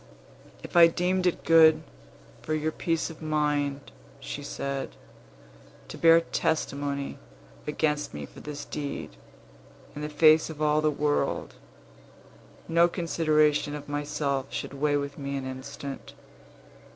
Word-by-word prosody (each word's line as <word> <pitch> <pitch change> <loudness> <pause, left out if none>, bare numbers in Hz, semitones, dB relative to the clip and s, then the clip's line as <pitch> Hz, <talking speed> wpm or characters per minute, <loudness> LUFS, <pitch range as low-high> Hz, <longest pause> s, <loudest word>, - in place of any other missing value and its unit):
"If - - -10
I 170 -1 +9
deemed 180 +2 0
it 175 - -1
good 160 -1 +6 0.6
for 155 - -2
your 155 +1 -1
peace 165 0 -1
of 165 - -14
mind," 145 -2 -1 0.3
she 140 +1 -6
said, 140 -1 -4 0.9
"to - - -7
bear 165 0 +6
testimony 140 -4 -2 0.5
against 150 -1 0
me 75 -1 -6
for - - -14
this 145 -1 -7
deed 140 - -5 0.8
in 145 - -6
the 150 - -3
face 155 +1 +5
of 155 -2 -8
all 150 0 +2
the 155 - +3
world, 150 0 -1 1.1
no 170 +1 +4
consideration 155 -4 +1
of 145 -1 -8
myself 145 -2 -2
should - - -5
weigh 145 +1 +1
with 140 0 -5
me 140 0 -3
an 135 - -5
instant. 135 +1 -7
150 Hz, 130 wpm, -27 LUFS, 140-160 Hz, 1.1 s, I